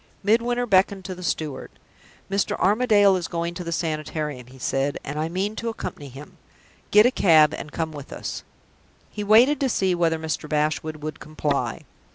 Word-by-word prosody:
Midwinter 240 +4 +2
beckoned 195 -2 +2
to 190 - -4
the 180 - -10
steward. 155 -5 -3 0.6
"Mr. 195 +1 -1
Armadale 205 -1 +4
is 175 - -4
going 170 0 -3
to 180 - -6
the 170 - -5
Sanitarium," 155 -5 -3
he 130 +1 -15
said, 135 +2 -1
"and 145 +2 -5
I 160 +1 -1
mean 195 +5 -2
to 230 - -2
accompany 145 -10 -6
him. 135 +4 -12 0.5
Get 210 +1 +6
a 245 - +4
cab 155 - +5
and 150 - -7
come 160 -1 -3
with 145 -3 -10
us." - - -6 0.7
He 210 - -5
waited, 235 +8 +5
to 270 - +1
see 190 -5 +1
whether 165 -2 +1
Mr. 160 -1 -4
Bashwood 155 0 -1
would 155 0 -5
comply. 150 -2 -2
170 Hz, 180 wpm, -24 LUFS, 150-205 Hz, 0.7 s, Get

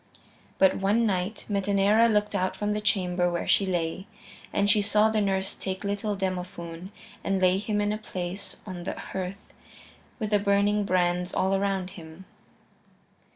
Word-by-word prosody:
But 190 -1 +4
one 205 +4 +2
night 195 +1 -1
Metaneira 200 +2 +3
looked 210 0 +1
out 185 -2 0
from 210 0 -1
the 210 - -2
chamber 180 -4 +1
where 170 - -2
she 195 - +3
lay, 175 +2 -2 0.4
and 200 0 +1
she 210 0 +4
saw 210 +1 +3
the 215 -1 +1
nurse 190 -1 0
take 190 +1 -5
little 205 +1 -2
Demophoön 180 -2 -4 0.3
and 195 -1 0
lay 185 0 +3
him 210 0 -1
in 205 0 +1
a 215 - -4
place 185 -1 -5
on 185 -3 -6
the - - -2
hearth 190 +1 -6 0.6
with 215 -4 -3
the 205 - +4
burning 200 +1 +2
brands 180 -1 +1
all 190 +1 +2
around 195 -1 0
him. 160 +1 -11
195 Hz, 160 wpm, -27 LUFS, 185-205 Hz, 0.6 s, But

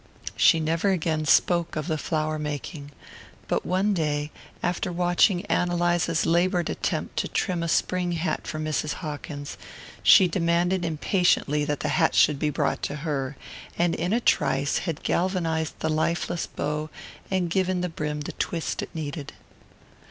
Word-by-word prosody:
She 165 - +5
never 165 +5 +1
again 160 -4 0
spoke 170 +3 +3
of 155 - -2
the 160 -2 -1
flower 155 0 -1
making, 145 0 -5 0.6
but - - -1
one 190 +3 +2
day, 150 -3 -1 0.3
after 180 +1 -1
watching 175 +2 +2
Ann 180 - +1
Eliza's 175 -2 +1
laboured 175 +2 +2
attempt - - -3
to - - 0
trim 180 -4 -1
a 170 - -1
spring 180 +1 0
hat 165 -2 -2
for 155 - -4
Mrs. 155 -1 -1
Hawkins, 145 -1 -6 0.4
she 190 - +7
demanded 175 +1 +1
impatiently 160 -2 +1
that 145 -1 -2
the - - -1
hat - - +2
should 150 -2 +4
be 150 - +1
brought 150 - -1
to - - -3
her, 140 -3 -2 0.4
and 175 -1 +2
in 175 - -1
a 230 - +3
trice 140 - +1
had 160 - -4
galvanized 165 -3 0
the 160 - 0
lifeless 170 +2 -1
bow 150 +1 -3 0.4
and 185 -3 0
given 185 -1 +1
the 180 - 0
brim 150 -3 -4
the 145 - -5
twist 165 -2 -3
it - - -6
needed. 150 -2 -5
165 Hz, 160 wpm, -25 LUFS, 150-175 Hz, 0.6 s, she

